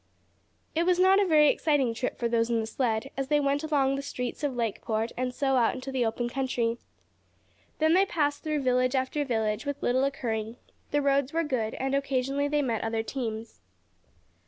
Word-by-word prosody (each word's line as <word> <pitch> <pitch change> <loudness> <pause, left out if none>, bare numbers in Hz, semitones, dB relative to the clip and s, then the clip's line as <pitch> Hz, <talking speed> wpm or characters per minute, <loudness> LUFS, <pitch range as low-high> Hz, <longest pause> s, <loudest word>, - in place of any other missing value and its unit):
It 335 +2 +1
was 360 -1 +4
not 380 +2 +5
a 395 - +2
very 305 -3 +6
exciting 280 -7 +1
trip 250 +3 -3
for 235 - 0
those 230 0 +1
in 230 -1 +1
the 220 - -1
sled, 225 +1 -1
as 270 0 -2
they 295 +1 +3
went 285 +1 0
along 290 -4 +2
through 275 - 0
the - - -3
streets 250 0 -5
of 280 -3 -1
Lakeport 225 -1 -2
and 255 0 -2
so 270 +1 +1
out 235 -2 +2
into 260 +1 -6
the 250 -3 +1
open 240 +2 -2
country. 240 -2 -1 1.0
Then 315 +1 +3
they 385 +2 +4
passed 290 -4 0
through 305 -2 -2
village 255 0 +2
after 260 +3 0
village, 220 -4 -1
with 285 -1 -4
little 255 +2 +2
occurring. 225 -5 -2 0.3
The 290 0 +1
roads 275 0 +1
were 330 +1 +1
good, 245 -7 -2
and 270 +1 -2
occasionally 275 0 0
they 295 0 +1
met 230 -4 -1
other 225 0 -1
teams. 225 - -5
265 Hz, 200 wpm, -28 LUFS, 235-285 Hz, 1.0 s, very